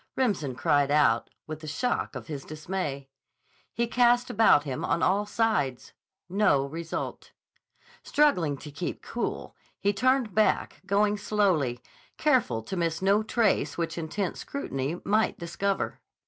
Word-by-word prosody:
Remsen 185 - 0
cried 145 +2 +2
out, 145 -6 +3 0.2
with 155 -1 -6
the 155 - -9
shock 245 +11 -1
of - - -6
his 145 -4 -6
dismay. 155 -3 -4 0.6
He 235 - 0
cast 245 +1 +3
about 205 -9 +5
him 135 -4 -4
on 170 - 0
all 205 +3 +2
sides. 205 - 0 0.3
No 180 -8 +2
result. 165 +4 -5 0.7
Struggling 180 - +2
to 150 +2 -10
keep 145 +5 -5
cool, 240 - -4 0.2
he 200 0 +1
turned 250 0 +2
back, 215 0 +1
going 205 +1 +2
slowly, 180 - +1 0.4
careful 240 - +2
to 190 - -5
miss 165 0 -1
no 200 +2 +4
trace 215 -9 +1
which 170 -1 -2
intent 170 +3 -3
scrutiny 155 - -4
might 215 +2 +2
discover. 185 +3 -2
180 Hz, 135 wpm, -27 LUFS, 145-215 Hz, 0.7 s, about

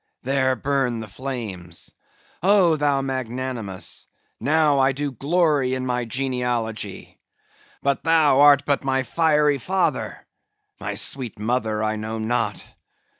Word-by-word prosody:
There 130 0 +1
burn 135 -4 0
the 110 - -6
flames! 100 -8 -6 0.5
Oh, 185 -3 +4
thou 145 -2 +1
magnanimous! 125 -6 -4 0.3
now 150 -1 +3
I 135 0 +3
do 145 +1 -3
glory 145 -1 +1
in 130 0 -3
my 125 -1 -1
genealogy. 120 -5 -3 0.6
But 140 0 0
thou 160 -4 +4
art 145 -1 +7
but 140 -1 +1
my 135 -1 +1
fiery 150 -1 +2
father; 190 +9 -1 0.5
my - - -4
sweet 130 -5 -1
mother, 110 -1 -1
I 110 0 0
know 110 +1 -4
not. 110 +3 -1
130 Hz, 125 wpm, -23 LUFS, 115-145 Hz, 0.6 s, art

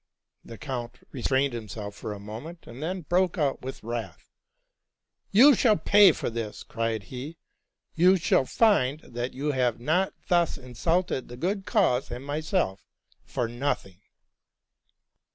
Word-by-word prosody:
The 115 - -10
count 125 -4 -5
restrained 135 +1 0
himself 105 -2 -6
for 105 - -6
a 105 - -6
moment, 115 - -9
and 120 +4 -10
then 180 +4 -3
broke 180 +3 +1
out 145 -4 0
with 130 +1 -7
wrath, 115 0 -6 0.5
'' - - -52
You 285 +4 +9
shall 220 -3 +3
pay 205 -2 +6
for 145 - -4
this,'' 115 -2 -5
cried 115 -2 -2
he: 135 +8 -8 0.3
'+ - - -57
you 180 +3 +5
shall 160 -5 +2
find 155 - +2
that 120 +1 -5
you 145 +3 -1
have 125 -4 0
not 170 +9 0
thus 175 -2 +2
insulted 135 +4 -1
the 120 - -10
good 195 +7 -2
cause 160 - +2
and 125 +3 -7
myself 150 - -1 0.4
for 120 - -2
nothing 120 -6 -3
135 Hz, 150 wpm, -27 LUFS, 120-175 Hz, 0.5 s, You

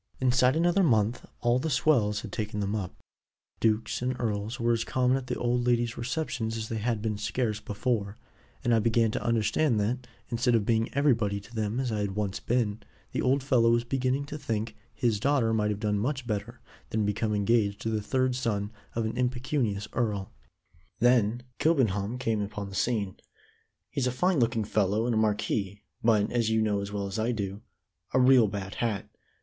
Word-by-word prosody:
"Inside 130 +1 +3
another 175 +4 +3
month 115 - +2
all 120 +1 +3
the 160 - -2
swells 125 -6 +2
had - - -8
taken 105 -2 -3
them 100 0 -1
up; 95 -4 -4 0.6
dukes 110 +1 +1
and 125 0 -2
earls 110 0 -2
were 120 0 +2
as 115 -1 0
common 125 +1 +2
at 135 -1 -4
the 125 - -2
old 120 0 0
lady's 120 0 +2
receptions 120 -3 -2
as 110 0 -4
they 110 - -2
had 110 -1 -1
been 105 -2 -2
scarce 110 0 -1
before 105 -1 -2 0.5
and 120 - +2
I 115 - +5
began 115 0 +2
to - - -3
understand 115 +2 +2
that, 125 +4 -2 0.2
instead 120 +1 +2
of 110 -3 +2
being 115 0 +1
everybody 115 -8 +2
to 115 - -16
them 110 +1 -1
as 130 -3 -1
I 105 - -1
had 100 -2 -2
once 105 -2 -2
been, 110 -3 0 0.3
the - - -1
old 135 +1 +2
fellow 125 -4 +4
was 120 0 +3
beginning 130 +2 0
to 150 +2 -7
think 110 -5 -3 0.2
his 115 -4 0
daughter 130 -3 +2
might 105 -1 +1
have 105 -1 -2
done 105 -2 0
much 130 +3 -2
better 115 +2 -4 0.3
than 110 -1 0
become 105 +1 0
engaged 100 -1 +2
to 110 - -2
the 110 -1 0
third 130 +4 +1
son 105 -5 -1 0.2
of 115 -1 0
an 110 - -3
impecunious 125 -4 -1
earl. 105 -6 -1 0.7
"Then 120 0 +3 0.2
Kilbenham 115 - +1
came 115 -4 0
upon 100 0 -5
the 95 - -8
scene. 105 -6 0 0.7
He's 140 -3 0
a - - +1
fine 180 +6 +1
looking 115 -2 +1
fellow 105 +1 +1
and 120 - +1
a - - +1
marquis, 105 -2 -1 0.2
but, 110 -3 +3
as 115 -2 +1
you 110 0 +2
know 105 -2 +1
as 100 0 -5
well 100 -1 -2
as 100 +2 -4
I 115 +3 +1
do, 100 -3 -4 0.5
a - - +5
real 125 -3 +6
bad 100 -1 -5
hat. 110 -5 -1
115 Hz, 195 wpm, -28 LUFS, 105-125 Hz, 0.7 s, real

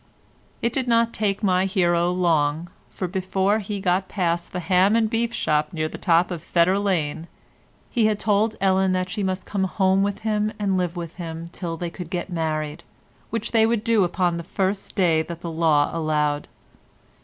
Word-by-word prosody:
It 235 0 +1
did 260 -1 -1
not 230 -1 +3
take 205 0 -1
my 185 -1 +3
hero 175 -3 +2
long, 165 -2 +1 0.2
for 185 - -4
before 190 +3 0
he 205 -1 -4
got 185 0 +1
past 170 -3 -1
the 180 - -3
ham 190 +4 +3
and 230 -1 +3
beef 230 +1 -1
shop 150 -9 0
near 155 -1 -1
the - - -8
top 175 0 +3
of 170 -3 -4
Fetter 175 +4 +2
Lane, 165 -5 -1 0.6
he 230 -4 +3
had 215 -1 +1
told 215 +1 +1
Ellen 190 -1 +2
that 185 0 -1
she 220 - -3
must 190 -1 -2
come 195 -2 -1
home 190 0 +2
with 200 0 -1
him 215 -1 0
and 200 -2 0
live 180 -1 -1
with 170 -1 -6
him 165 -1 -6
till 170 -3 -5
they 170 0 -4
could 175 -1 -8
get 180 +1 -4
married, 155 -2 -2 0.5
which 230 0 -3
they 225 -1 +4
would 230 -2 0
do 230 -3 +3
upon 175 -1 0
the 170 - -5
first 195 +3 -2
day 170 -4 +3
that 170 +1 -7
the 170 - -5
law 160 -3 +2
allowed. 150 -2 0
185 Hz, 190 wpm, -23 LUFS, 170-205 Hz, 0.6 s, they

